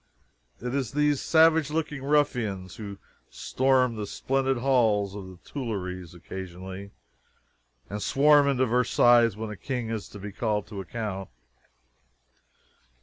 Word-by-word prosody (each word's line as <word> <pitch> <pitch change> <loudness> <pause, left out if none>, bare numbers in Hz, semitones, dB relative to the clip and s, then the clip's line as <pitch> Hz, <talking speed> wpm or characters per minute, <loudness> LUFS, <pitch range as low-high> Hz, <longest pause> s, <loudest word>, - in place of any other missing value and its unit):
It 125 +1 -4
is 135 -4 -2
these 150 -1 +2
savage 160 -2 +4
looking 150 -3 -3
ruffians 125 -10 0
who 100 -2 -7 0.3
storm 130 -3 +1
the 105 -1 -4
splendid 135 +3 0
halls 115 -6 +2
of 100 -2 -7
the 95 -1 -12
Tuileries 95 - -5
occasionally, 95 +2 -8 1.0
and 105 +1 -5
swarm 145 +4 +5
into 130 -2 +2
Versailles 120 -2 +4
when 110 0 -5
a - - -6
king 120 +1 -4
is 110 -2 -4
to - - -10
be 105 +1 -7
called 105 0 -1
to 100 -2 -5
account. 95 -1 -5
115 Hz, 130 wpm, -27 LUFS, 100-135 Hz, 1.0 s, swarm